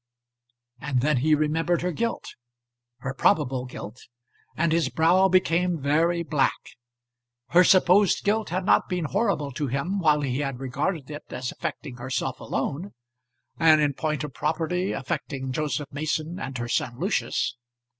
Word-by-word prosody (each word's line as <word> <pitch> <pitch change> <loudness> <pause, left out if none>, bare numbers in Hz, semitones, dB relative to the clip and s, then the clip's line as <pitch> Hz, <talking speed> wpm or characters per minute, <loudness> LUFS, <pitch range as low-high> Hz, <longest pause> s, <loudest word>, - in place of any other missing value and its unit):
And 135 -3 -1
then 150 +1 +2
he 155 +5 +3
remembered 165 +3 0
her 180 - 0
guilt, 230 +7 -3 0.7
her 135 +1 -3
probable 130 -2 +1
guilt, 125 -2 -9 0.5
and 165 0 +1
his 165 0 +2
brow 175 +4 +4
became 180 -2 +2
very 165 +5 +1
black. 150 -4 0 0.8
Her 180 +2 +6
supposed 185 +2 +4
guilt 215 +1 +1
had 185 +2 -2
not - - +3
been 180 -3 -1
horrible 195 -5 0
to 145 +3 -3
him 140 +10 -1
while 150 -4 +3
he 130 -1 -1
had 135 -3 -3
regarded 140 +3 -3
it 150 - -8
as 125 0 -4
affecting 135 -5 -6
herself 130 +1 -3
alone, 155 +9 -3 0.6
and 160 -2 +6
in 145 -2 +2
point 155 +1 -2
of 150 -3 -6
property 165 +7 -1
affecting 135 -1 -4
Joseph 150 0 -2
Mason 155 +3 -2
and 130 -2 -5
her 120 0 -3
son 120 0 -1
Lucius. 170 - -1
155 Hz, 150 wpm, -25 LUFS, 135-175 Hz, 0.8 s, Her